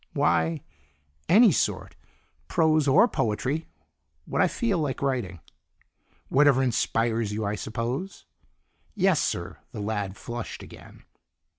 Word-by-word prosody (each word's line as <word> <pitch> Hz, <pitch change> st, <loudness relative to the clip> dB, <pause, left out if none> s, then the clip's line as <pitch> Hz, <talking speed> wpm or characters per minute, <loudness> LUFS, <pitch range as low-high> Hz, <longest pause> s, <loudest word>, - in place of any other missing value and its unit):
"Why 150 Hz, +2 st, +1 dB, 0.7 s
any 215 Hz, +2 st, +7 dB
sort. -, -, -1 dB, 0.5 s
Prose 155 Hz, -2 st, +2 dB
or 185 Hz, -, +6 dB
poetry; 130 Hz, -, -2 dB, 0.6 s
what -, -, -1 dB
I -, -, +5 dB
feel 220 Hz, -8 st, -1 dB
like 145 Hz, -4 st, -2 dB
writing." 120 Hz, -, -2 dB, 0.9 s
"Whatever 135 Hz, -1 st, +4 dB
inspires 115 Hz, -2 st, 0 dB
you, 105 Hz, +1 st, -3 dB
I 100 Hz, -, -1 dB
suppose?" 120 Hz, -, -4 dB, 0.7 s
"Yes, 190 Hz, -5 st, +3 dB
sir." 85 Hz, +2 st, -3 dB
The 110 Hz, -, -6 dB
lad 100 Hz, -2 st, -3 dB
flushed 120 Hz, -1 st, -7 dB
again. -, -, -14 dB
130 Hz, 115 wpm, -26 LUFS, 110-160 Hz, 0.9 s, any